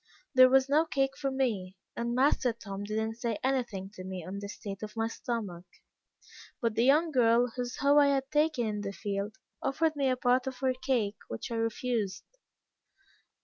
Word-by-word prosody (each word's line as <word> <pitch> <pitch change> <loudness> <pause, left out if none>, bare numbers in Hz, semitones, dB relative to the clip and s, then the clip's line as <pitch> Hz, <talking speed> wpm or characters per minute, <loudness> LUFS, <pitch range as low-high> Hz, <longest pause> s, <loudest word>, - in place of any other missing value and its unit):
There 255 -1 +8
was 265 0 +4
no 295 +3 +4
cake 270 -2 0
for 275 - -2
me, 215 -9 -1 0.2
and 235 0 -2
master 255 -2 +3
Tom 200 -3 -7
did 215 +1 -3
not 220 +1 -2
say 235 -3 -2
anything 235 -8 -1
to 185 - -9
me 185 -2 -6
on 195 +2 -5
the 200 0 -6
state 200 -2 -7
of 215 +1 -7
my 225 0 +1
stomach; 210 -7 -4 0.9
but 230 -3 0
the 230 - +2
young 310 +5 +4
girl, 240 -2 +4
whose 245 -1 -3
hoe 285 +1 +4
I 285 - +6
had 270 -1 0
taken 300 -5 +2
in 210 -1 -2
the 200 -1 -4
field, 200 +1 -3 0.3
offered 315 +3 +1
me 275 -2 +1
a 255 - +1
part 250 +1 +2
of 260 -1 -4
her 260 0 +1
cake, 240 -6 -1
which 115 - -6
I - - -1
refused. 225 -4 -1
235 Hz, 190 wpm, -30 LUFS, 205-265 Hz, 0.9 s, There